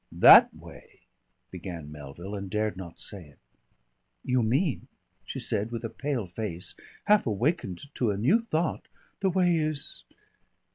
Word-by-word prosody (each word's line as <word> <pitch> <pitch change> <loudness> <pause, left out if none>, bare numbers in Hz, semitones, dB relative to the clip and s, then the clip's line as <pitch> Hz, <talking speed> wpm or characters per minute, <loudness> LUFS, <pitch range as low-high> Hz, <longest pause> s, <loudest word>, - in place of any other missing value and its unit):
"That - - +9
way - - -15 0.2
" - - -47
began 85 -4 -7
Melville 75 +6 -9
and 100 -2 -5
dared 105 0 -1
not 90 -3 -9
say 100 -4 -7
it. 75 -3 -19 0.9
"You 125 -1 +2
mean," 130 - 0 0.4
she - - -5
said, 105 +3 -1
with 115 -1 -5
a 115 - -4
pale 130 -2 -2
face, 90 -1 -5 0.3
half 210 -7 +4
awakened 120 - -2
to 120 - 0
a 100 - -1
new 135 - +3
thought, 170 -8 -2 0.3
"the 195 - +2
way 180 -1 +3
is 155 -3 -2
110 Hz, 150 wpm, -28 LUFS, 95-150 Hz, 0.9 s, That